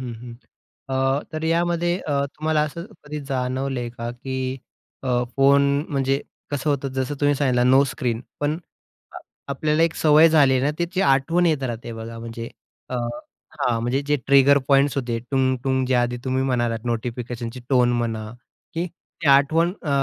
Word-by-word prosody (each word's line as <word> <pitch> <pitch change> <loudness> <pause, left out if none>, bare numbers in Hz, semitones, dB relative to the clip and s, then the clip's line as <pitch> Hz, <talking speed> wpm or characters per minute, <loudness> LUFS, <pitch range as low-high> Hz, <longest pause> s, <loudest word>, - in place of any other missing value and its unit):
हं, 125 -2 -5
हं. 120 -1 -9 0.5
अ, 135 +1 +1
तर 155 - -4
यामध्ये 175 +1 +1
अ, 140 -2 +1
तुम्हाला 155 0 +1
असं 155 +3 -4 0.2
कधी 150 0 -5
जाणवलंय 130 -1 -2
का, 115 0 -5
की 130 +1 -4 0.5
अ, 125 -2 +1
फोन 140 +1 +5 0.3
म्हणजे 135 -1 0 0.3
कसं 145 +1 -1
होतं 140 -1 -1
जसं 130 +2 -2
तुम्ही 145 0 +3
सांगितलं, 125 -3 +2
नो 135 +1 +6
स्क्रीन 120 -2 -2 0.2
पण, 150 +2 0 0.5
आ - - -7 0.3
आपल्याला 150 +3 +1
एक 165 -1 +2
सवय 155 +1 +6
झाली 145 -4 +5
आहे 130 - +1
ना 140 - +2
त्याची 175 +2 -1
आठवण 140 +6 +3
येत 155 -4 +1
राहते 120 -2 -4
बघा 115 0 -7
म्हणजे 115 0 -6 0.4
अ - - -5 0.6
हां, 115 -2 +1
म्हणजे 120 +4 0
जे 150 0 +2
ट्रिगर 140 +1 +6
पॉइंट्स 140 0 +4
होते. 120 -4 -1
टुंग-टुंग 130 -1 +1
जे 130 - +1
आधी 120 0 +1
तुम्ही 130 0 0
म्हणालात 120 -3 0
नोटिफिकेशनची 120 +1 -4
टोन 125 -2 +3
म्हणा, 115 -2 -2 0.5
की 170 +2 -1
ती 175 -1 -11
आठवण 155 +5 +4
अ, 155 - -5
135 Hz, 165 wpm, -23 LUFS, 125-150 Hz, 0.6 s, नो